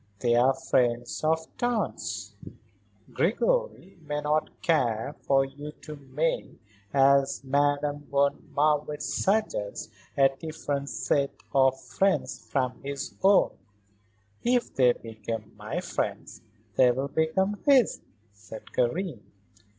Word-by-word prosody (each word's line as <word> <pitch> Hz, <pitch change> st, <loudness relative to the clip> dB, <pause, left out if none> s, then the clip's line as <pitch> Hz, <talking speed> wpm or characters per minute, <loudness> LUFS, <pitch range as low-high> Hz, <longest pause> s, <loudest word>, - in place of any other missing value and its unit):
They 120 Hz, +3 st, +1 dB
are 130 Hz, +3 st, +4 dB
friends 120 Hz, -1 st, 0 dB
of 160 Hz, +1 st, +1 dB
Tante's." 240 Hz, -2 st, -2 dB, 0.8 s
"Gregory -, -, 0 dB
may 150 Hz, -1 st, -3 dB
not 150 Hz, +1 st, 0 dB
care 140 Hz, -7 st, +1 dB
for 135 Hz, -1 st, +4 dB
you 145 Hz, +2 st, -9 dB
to 155 Hz, -, -8 dB
make 145 Hz, +3 st, -2 dB, 0.3 s
as 140 Hz, 0 st, +3 dB
Madame 145 Hz, +1 st, 0 dB
von 140 Hz, 0 st, +1 dB
Marwitz 150 Hz, 0 st, +1 dB
suggests 195 Hz, -, -1 dB, 0.3 s
a 135 Hz, -1 st, +7 dB
different 145 Hz, -3 st, -3 dB
set 140 Hz, -1 st, 0 dB, 0.2 s
of 130 Hz, -1 st, +4 dB
friends 195 Hz, +6 st, 0 dB
from 130 Hz, -2 st, -1 dB
his 140 Hz, 0 st, -5 dB
own." 195 Hz, +1 st, +5 dB, 0.9 s
"If 245 Hz, 0 st, +1 dB
they 125 Hz, -2 st, +5 dB
become 110 Hz, -1 st, -7 dB
my -, -, -4 dB
friends -, -, -4 dB, 0.4 s
they 130 Hz, -1 st, +6 dB
will 130 Hz, +3 st, 0 dB
become 190 Hz, +7 st, 0 dB
his," 270 Hz, -5 st, +4 dB, 0.3 s
said 105 Hz, +2 st, -12 dB
Karen. 135 Hz, -, -1 dB
140 Hz, 110 wpm, -27 LUFS, 130-160 Hz, 0.9 s, a